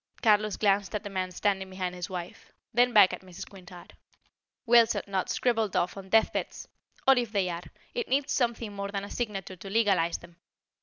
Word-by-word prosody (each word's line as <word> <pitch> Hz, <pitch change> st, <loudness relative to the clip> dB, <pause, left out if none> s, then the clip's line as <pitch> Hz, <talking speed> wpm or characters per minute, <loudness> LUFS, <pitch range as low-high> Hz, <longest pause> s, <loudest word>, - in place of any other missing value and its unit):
Carlos 215 Hz, -2 st, +3 dB
glanced 200 Hz, 0 st, +1 dB
at 210 Hz, -, -3 dB
the 205 Hz, -, -7 dB
man 185 Hz, -1 st, -2 dB
standing 190 Hz, +1 st, -1 dB
behind 185 Hz, -1 st, -4 dB
his 180 Hz, -1 st, -6 dB
wife; 180 Hz, -2 st, -7 dB, 0.2 s
then 245 Hz, +2 st, +4 dB
back 205 Hz, -5 st, +7 dB
at -, -, -6 dB
Mrs. 185 Hz, -1 st, -10 dB
Quintard. 180 Hz, -2 st, -13 dB, 0.7 s
"Wills 235 Hz, -1 st, +5 dB
are -, -, -2 dB
not 195 Hz, -2 st, -2 dB
scribbled 225 Hz, -5 st, 0 dB
off 180 Hz, -, +1 dB
on 195 Hz, -1 st, -9 dB
deathbeds; 220 Hz, +2 st, +1 dB, 0.4 s
or 270 Hz, -, +8 dB
if 235 Hz, -3 st, -3 dB
they 195 Hz, -4 st, +1 dB
are, 170 Hz, 0 st, -4 dB, 0.3 s
it 475 Hz, -2 st, -2 dB
needs 275 Hz, +1 st, +1 dB
something 235 Hz, -4 st, -1 dB
more 200 Hz, 0 st, -4 dB
than 200 Hz, -1 st, -3 dB
a 200 Hz, -, -8 dB
signature 195 Hz, -5 st, -4 dB
to 195 Hz, -, -9 dB
legalize 195 Hz, -6 st, +2 dB
them. 170 Hz, 0 st, -16 dB
200 Hz, 195 wpm, -28 LUFS, 185-225 Hz, 0.7 s, or